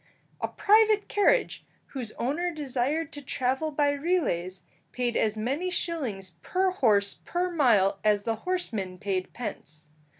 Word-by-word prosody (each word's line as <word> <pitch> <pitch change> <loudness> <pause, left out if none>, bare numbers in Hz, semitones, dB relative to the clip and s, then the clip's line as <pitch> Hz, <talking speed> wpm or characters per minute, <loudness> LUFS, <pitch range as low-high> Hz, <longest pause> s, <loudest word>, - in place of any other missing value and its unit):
A - - 0
private 430 0 +4
carriage, 450 +5 +2 0.3
whose 250 -6 -6
owner 330 +8 -1
desired 290 +1 -2
to 290 - -6
travel 265 +3 -1
by 290 -1 +2
relays, 280 - -1 0.3
paid 245 -1 -1
as 220 0 +1
many 275 +12 -1
shillings 255 - -3
per 375 0 +1
horse 210 - +2
per 360 +1 -1
mile 210 - +3
as 210 -1 +3
the 225 0 -1
horseman 220 - -3
paid 190 -2 -2
pence. 155 -10 -7
265 Hz, 135 wpm, -27 LUFS, 205-340 Hz, 0.3 s, private